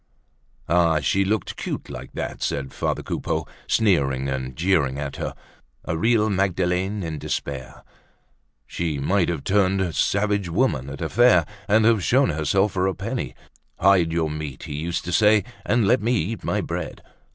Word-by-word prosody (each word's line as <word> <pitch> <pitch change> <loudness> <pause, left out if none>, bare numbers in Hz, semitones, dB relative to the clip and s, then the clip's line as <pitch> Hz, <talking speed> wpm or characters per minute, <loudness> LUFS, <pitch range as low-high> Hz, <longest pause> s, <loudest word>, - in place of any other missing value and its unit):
Ah! 85 -2 +3
she 100 - +1
looked 105 0 -1
cute - - -4
like - - -9
that - - -5
said 65 -2 -2
father - - -2
Coupeau, - - -2 0.2
sneering 70 - +2
and 65 -1 -4
jeering 80 -6 +1
at 70 -1 -5
her, - - -4 0.5
a - - -2
real 110 +5 +2
Magdalene 95 0 0
in 80 -2 -4
despair! 70 -2 -5 0.8
She 80 -4 -3
might 85 +6 +1
have 80 -5 -3
turned 95 -3 +1
"savage 100 +3 +1
woman" 80 - 0
at 70 0 -8
a - - -2
fair, 120 -9 +5 0.2
and 110 +2 +4
have 110 -4 +4
shown 130 0 +3
herself 95 +7 +1
for 95 0 0
a 95 - -1
penny. 100 - -4 0.4
Hide 90 -3 +4
your 80 -2 0
meat, 75 -3 -6
he 75 - -6
used 80 +4 -3
to 90 - -3
say, 105 +1 +4 0.2
and 120 -3 +3
let 100 - +4
me 115 +3 +1
eat 110 +2 -2
my - - 0
bread! - - -5
90 Hz, 165 wpm, -23 LUFS, 75-100 Hz, 0.8 s, fair